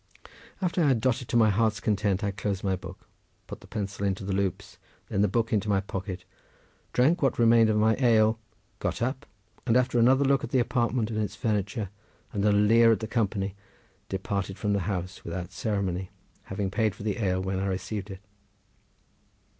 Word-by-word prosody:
After 175 -1 +1
I - - +4
had 130 -4 +3
dotted 125 +1 0
to - - +1
my 110 -2 +5
heart's 110 0 +1
content 100 -2 0
I 100 - 0
closed 100 -1 -3
my 95 -2 +1
book, 90 0 -11 0.4
put - - -9
the - - -15
pencil 100 -1 -4
into 95 -1 -1
the 100 - -2
loops, 95 -2 -2 0.3
then 100 - 0
the 105 - +4
book 115 +4 0
into 105 0 +1
my 100 -1 +3
pocket, 95 -1 -5 0.7
drank 140 +8 +3
what 135 -3 +2
remained 115 -1 +5
of 105 - +2
my 110 +1 +4
ale, 110 -3 +4 0.4
got - - -2
up, 130 +3 -3 0.4
and, 115 0 +4
after 125 -1 +2
another 130 +4 +5
look 135 +1 +2
at - - -4
the 130 - +1
apartment 120 -2 0
and 110 -1 -1
its 100 -1 -3
furniture 100 -1 -2 0.4
and 100 - -1
a 105 - +4
leer 115 +3 +5
at 110 - +2
the 110 - -4
company, 105 -4 -1 0.6
departed 95 0 -3
from 105 -1 0
the 100 - +1
house 90 -1 -4
without 90 +1 -5
ceremony, 95 -3 -2 0.4
having 95 0 -3
paid 110 -1 +1
for - - -9
the 105 -1 -2
ale 95 -4 +1
when 95 0 -2
I 100 - -1
received 95 +2 -4
it. 95 -1 -8
105 Hz, 195 wpm, -27 LUFS, 95-115 Hz, 0.7 s, my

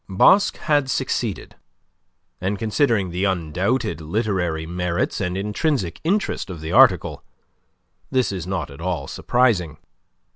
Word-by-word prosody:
Basque 145 - +4
had 145 -3 +1
succeeded, 120 -6 -2 0.9
and, 95 +3 -1
considering 110 - +1
the 90 +2 -2
undoubted 95 - -1
literary 90 -3 -1
merits 90 +2 -2
and 90 -1 -2
intrinsic 105 - -1
interest 190 - -1
of 90 -3 -6
the 80 +1 -5
article, 110 -6 +4 0.9
this 130 -6 +1
is 90 -3 -5
not 90 -6 -3
at 70 - -11
all 85 -6 -2
surprising. 100 -12 +1
95 Hz, 120 wpm, -22 LUFS, 85-120 Hz, 0.9 s, Basque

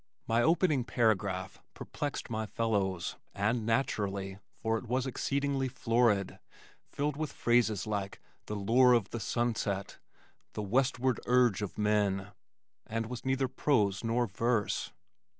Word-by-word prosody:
My 115 +1 +3
opening 160 -3 +3
paragraph 100 -6 0
perplexed 145 -1 -4
my 110 -1 -2
fellows, 100 -6 -1 0.2
and 110 +3 0
naturally, 100 -5 -1 0.2
for 110 0 -1
it 125 - -12
was 125 +2 0
exceedingly 140 +1 -1
florid, 115 -5 +1 0.5
filled 145 0 -1
with 155 0 -3
phrases 115 -5 +2
like 100 -2 -3 0.3
"the 105 - -3
lure 120 +5 +5
of 115 -4 +1
the 115 - -3
sunset," 110 -3 -2 0.5
"the 105 - -3
westward 130 +3 +1
urge 125 -5 +4
of 105 - -5
men," 105 -3 +1 0.6
and 115 +1 -2
was 120 +1 -6
neither 130 0 +1
prose 120 -7 +1
nor 115 +2 +1
verse. 115 +1 -1
115 Hz, 130 wpm, -31 LUFS, 100-125 Hz, 0.6 s, lure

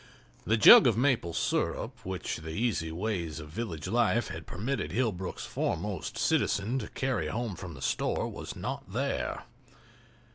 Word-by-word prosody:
The 110 - +3
jug 110 - +10
of 115 -3 +2
maple 125 -9 +2
sirup - - -1
which 95 -1 -3
the 80 0 -8
easy 85 -3 -1
ways 85 -4 -3
of 75 -1 -9
village 80 -4 -5
life 120 0 +2
had 80 0 -7
permitted 115 +6 -3
Hillbrook's 105 -7 -2
foremost - - -3
citizen 110 +7 +1
to 105 - -5
carry 130 -1 -1
home 115 -3 -3
from 85 -4 -8
the 65 - -8
store - - 0
was - - -7
not - - -5
there. - - -2
105 Hz, 150 wpm, -30 LUFS, 85-120 Hz, -, jug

